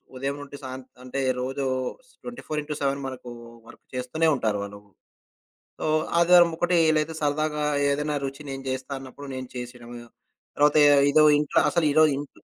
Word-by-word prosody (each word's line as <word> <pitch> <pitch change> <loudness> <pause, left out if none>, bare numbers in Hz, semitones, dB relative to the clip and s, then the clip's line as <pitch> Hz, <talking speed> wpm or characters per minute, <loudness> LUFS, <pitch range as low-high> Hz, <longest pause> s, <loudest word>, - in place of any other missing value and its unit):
ఉదయం 135 +2 -3
నుండి 145 0 -10
సాంత్ 130 0 -7 0.2
అంటే, 130 +2 -5 0.2
రోజు 135 +2 -3 0.6
24 240 -11 -5
ఇన్ 150 - -14
టు 150 - -2
7 140 0 0
మనకు 130 -1 -8 0.4
వర్క్ - - -15
చేస్తూనే 125 +6 0
ఉంటారు 110 -5 -1
వాళ్ళు. 100 0 -8 1.0
సో, - - -5 0.3
ఆదివారం 175 0 +6
ఒకట 175 +2 0 0.3
లేతే 155 +1 -2
సరదాగా 150 +1 0 0.3
ఏదైనా 150 +1 -1
రుచి 135 +2 -5
నేను 135 0 -6
జేస్తా 130 +1 -4
అన్నప్పుడు 135 +2 -11
నేను 130 -1 -6
చేసేయడమ. 120 -1 -8 0.6
తర్వాత 150 +1 +4 0.3
ఏదో 155 +2 +5 0.2
ఇంట్లో 150 0 +2
అసల 170 -2 +1
ఇరో 155 +2 +6
ఇంట్లో 145 0 -8
140 Hz, 155 wpm, -25 LUFS, 130-150 Hz, 1.0 s, ఆదివారం